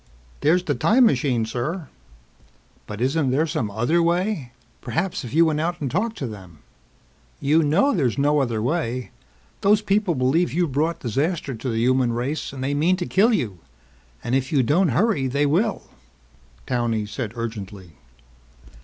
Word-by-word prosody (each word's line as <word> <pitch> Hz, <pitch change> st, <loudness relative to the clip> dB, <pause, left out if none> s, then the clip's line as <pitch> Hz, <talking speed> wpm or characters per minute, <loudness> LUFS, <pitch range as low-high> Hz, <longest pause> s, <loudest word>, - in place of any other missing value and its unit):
"There's 175 Hz, +4 st, +3 dB
the 150 Hz, -, 0 dB
time 220 Hz, -, +4 dB
machine, 130 Hz, -, +1 dB
sir." 145 Hz, +9 st, -4 dB, 1.0 s
"But 105 Hz, +1 st, -7 dB
isn't 135 Hz, +2 st, +1 dB
there 140 Hz, +5 st, +2 dB
some 150 Hz, -9 st, -2 dB
other 120 Hz, +12 st, +1 dB
way? 170 Hz, -, 0 dB, 0.3 s
Perhaps 175 Hz, 0 st, -2 dB
if 120 Hz, -, -7 dB
you 165 Hz, +1 st, +6 dB
went 155 Hz, -1 st, 0 dB
out 175 Hz, +2 st, -2 dB
and 140 Hz, -4 st, -3 dB
talked 220 Hz, +5 st, -1 dB
to 135 Hz, -, -3 dB
them...." 95 Hz, -, -10 dB, 0.8 s
"You 155 Hz, +4 st, +3 dB
know 165 Hz, -, +3 dB
there's 135 Hz, -, 0 dB
no 145 Hz, +1 st, +3 dB
other 115 Hz, -5 st, -1 dB
way. 125 Hz, -3 st, -2 dB, 0.5 s
Those 210 Hz, +1 st, +3 dB
people 200 Hz, -4 st, +1 dB
believe 140 Hz, +7 st, +1 dB
you've 170 Hz, -2 st, 0 dB
brought 160 Hz, +5 st, -1 dB
disaster 140 Hz, -, -1 dB
to 120 Hz, +3 st, -5 dB
the 115 Hz, -, -2 dB
human 125 Hz, +1 st, +2 dB
race 130 Hz, +6 st, -3 dB
and 135 Hz, -1 st, -6 dB
they 140 Hz, +2 st, -1 dB
mean 160 Hz, +6 st, +2 dB
to 180 Hz, -1 st, -3 dB
kill 210 Hz, +8 st, +3 dB
you. 105 Hz, -, -1 dB, 0.6 s
And 120 Hz, -, -3 dB
if 135 Hz, 0 st, 0 dB
you 140 Hz, -4 st, +3 dB
don't 165 Hz, +9 st, +2 dB
hurry 145 Hz, -, +1 dB
they 140 Hz, +3 st, +1 dB
will," 190 Hz, +9 st, +1 dB, 0.8 s
Towney 115 Hz, -3 st, -1 dB
said 105 Hz, +1 st, -5 dB
urgently. 105 Hz, -6 st, -6 dB
145 Hz, 165 wpm, -23 LUFS, 120-170 Hz, 1.0 s, you